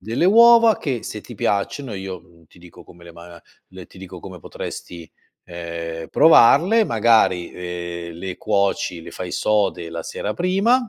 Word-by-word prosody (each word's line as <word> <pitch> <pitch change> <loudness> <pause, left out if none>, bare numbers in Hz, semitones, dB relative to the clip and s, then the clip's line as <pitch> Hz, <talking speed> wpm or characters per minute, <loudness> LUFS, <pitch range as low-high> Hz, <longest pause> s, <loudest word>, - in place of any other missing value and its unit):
Delle 115 - -1
uova 230 +1 +6
che, 130 -7 -3
se 105 - -7
ti 120 - -11
piacciono, 105 +6 -2
io, 95 -2 -7
mhmm, 85 -1 -24
ti 85 - -22
dico 90 -1 -15
come 85 0 -18
le 85 0 -13
ma 85 0 -14 0.3
le 95 -1 -12
ti - - -17
dico 95 -2 -10
come 95 -2 -10
potresti, 85 +1 -9 0.3
ehm, 85 -1 -7
provarle: 170 - +5
magari, 110 - +2
ehm, 85 -1 -7
le 95 +1 -6
cuoci, 100 -4 -1
le - - -11
fai 90 -1 -7
sode 95 -5 -1
la 85 -1 -6
sera 105 - -5
prima 210 +7 +1
95 Hz, 165 wpm, -20 LUFS, 85-120 Hz, 0.3 s, uova